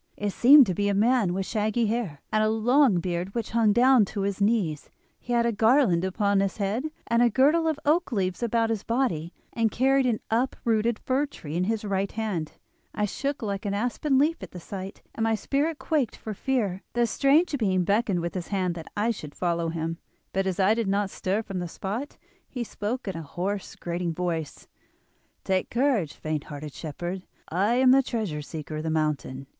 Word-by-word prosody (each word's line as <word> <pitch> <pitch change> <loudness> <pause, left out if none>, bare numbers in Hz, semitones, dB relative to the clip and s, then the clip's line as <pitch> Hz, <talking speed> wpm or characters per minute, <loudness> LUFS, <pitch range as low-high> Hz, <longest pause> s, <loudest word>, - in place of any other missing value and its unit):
It 205 0 -1
seemed 275 +6 +8
to 190 - -1
be 205 +3 0
a 200 - +1
man 225 -2 +3
with 190 +1 -2
shaggy 215 +2 0
hair, 210 -10 -2
and 215 0 +2
a 215 - +3
long 230 -1 +3
beard 180 +2 -3
which 230 -2 -3
hung 225 -2 +3
down 250 +2 +5
to 200 +1 -5
his 200 0 -2
knees. 200 -8 +1 0.3
He 245 - -8
had 235 -1 +3
a 235 - +2
garland 220 -5 +3
upon 200 +1 +1
his 195 -1 -1
head, 210 +6 -1 0.2
and 235 0 +2
a 240 - +5
girdle 295 +8 +3
of 310 -2 0
oak 310 +1 +2
leaves 185 -3 -1
about 230 -1 +1
his 220 -3 -1
body, 230 - -1 0.2
and 230 -1 +2
carried 265 +3 +2
an 230 -3 +1
uprooted 230 -1 +1
fir 270 +3 0
tree 155 - -8
in 180 +1 +1
his 220 +1 -1
right 195 -1 -1
hand. 205 -8 -3 0.4
I 210 - +1
shook 275 +6 -3
like 200 -2 -3
an 200 -1 -2
aspen 250 +6 0
leaf 305 +5 +2
at - - -7
the 180 - -7
sight, 190 +2 -8
and 225 - -2
my 225 0 +2
spirit 290 +7 -1
quaked 275 -2 -1
for 215 - -6
fear. 205 -5 -1
The 240 0 +2
strange 285 +7 +3
being 190 -5 +2
beckoned 200 -1 +1
with 170 0 -3
his 180 -3 -4
hand 185 -3 -1
that 165 -2 -9
I 220 +3 +2
should 150 -9 -8
follow 170 -2 -1
him; 165 +1 -3 0.3
but 195 0 0
as 190 -1 -2
I 195 +3 +5
did 225 -2 -1
not 200 0 0
stir 200 +4 -1
from 195 -3 -5
the 175 - -3
spot 210 - -5 0.3
he 250 -3 -4
spoke 225 +2 -4
in 190 - -3
a 165 - -4
hoarse, 185 +6 -4
grating 170 -1 -3
voice: 165 -3 -3 0.8
'Take 190 -1 0
courage, 240 - +1
faint 155 -2 -3
hearted 145 0 -8
shepherd. 175 +4 -6 0.2
I 200 +8 +1
am 255 0 +5
the 270 +1 +6
Treasure 215 - -3
Seeker 155 0 -6
of 155 - -4
the 160 - -2
mountain. 150 -4 -1
205 Hz, 205 wpm, -26 LUFS, 180-240 Hz, 0.8 s, seemed